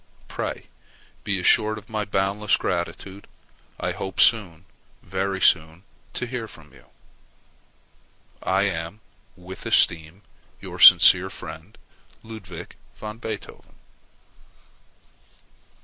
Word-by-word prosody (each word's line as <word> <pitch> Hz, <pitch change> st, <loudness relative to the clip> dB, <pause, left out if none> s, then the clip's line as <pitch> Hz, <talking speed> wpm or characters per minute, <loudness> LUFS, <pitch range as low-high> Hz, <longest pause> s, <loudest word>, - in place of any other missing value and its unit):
Pray -, -, -5 dB, 0.6 s
be 100 Hz, -2 st, -1 dB
assured 110 Hz, +4 st, +3 dB
of 105 Hz, 0 st, -12 dB
my 110 Hz, -1 st, -3 dB
boundless 100 Hz, +1 st, 0 dB
gratitude. 95 Hz, +3 st, -4 dB, 0.5 s
I -, -, -2 dB
hope 95 Hz, -1 st, -6 dB
soon, 95 Hz, -7 st, +3 dB, 0.4 s
very 95 Hz, -1 st, -3 dB
soon, 80 Hz, 0 st, +2 dB, 0.3 s
to -, -, -3 dB
hear 120 Hz, -2 st, -5 dB
from 80 Hz, -7 st, -16 dB
you. -, -, -20 dB, 1.5 s
I 95 Hz, +1 st, +1 dB
am, 95 Hz, +1 st, -4 dB, 0.3 s
with 90 Hz, +1 st, -10 dB
esteem, 85 Hz, +4 st, +1 dB, 0.4 s
your -, -, -9 dB
sincere 90 Hz, +1 st, +8 dB
friend, 80 Hz, +4 st, -11 dB, 0.5 s
LUDWIG 95 Hz, -7 st, -10 dB, 0.2 s
VAN 110 Hz, +1 st, -8 dB
BEETHOVEN. 110 Hz, -3 st, -8 dB
95 Hz, 100 wpm, -23 LUFS, 85-105 Hz, 1.5 s, sincere